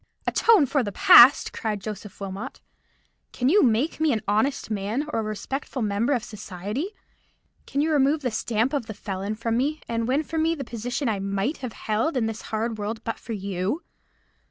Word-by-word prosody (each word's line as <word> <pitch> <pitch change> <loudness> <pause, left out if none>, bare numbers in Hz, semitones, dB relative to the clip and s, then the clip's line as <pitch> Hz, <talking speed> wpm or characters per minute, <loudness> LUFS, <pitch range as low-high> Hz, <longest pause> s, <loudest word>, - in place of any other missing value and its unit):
"Atone 435 -10 +4
for 275 +1 +1
the 205 -4 -3
past!" 240 +6 +7
cried 215 -3 -2
Joseph 210 -1 -8
Wilmot. 200 +6 -6 0.7
"Can 250 +1 +1
you 405 +7 +5
make 250 +6 +2
me 315 -1 +3
an 220 -3 -1
honest 220 +4 0
man, 215 +8 -2
or - - +1
a - - +1
respectable 230 +5 -4
member 215 +6 +1
of 240 -4 -1
society? 210 - -5 0.8
Can 280 - 0
you 315 +2 +1
remove 290 +1 +3
the 250 - 0
stamp 225 +3 0
of 275 -6 -1
the 220 - -6
felon 200 +1 -4
from 230 +1 -1
me, 295 +5 0
and 230 0 -1
win 275 +5 +1
for 320 +1 -3
me 325 +1 +2
the 280 - -5
position 245 +3 -3
I 215 -3 0
might 200 +8 -1
have 250 -4 -6
held 225 +8 -1
in 235 - +1
this 225 -1 -4
hard 220 0 -2
world 220 +2 -4
but 225 - -4
for 230 - -6
you? 200 - -3
230 Hz, 195 wpm, -25 LUFS, 210-275 Hz, 0.8 s, past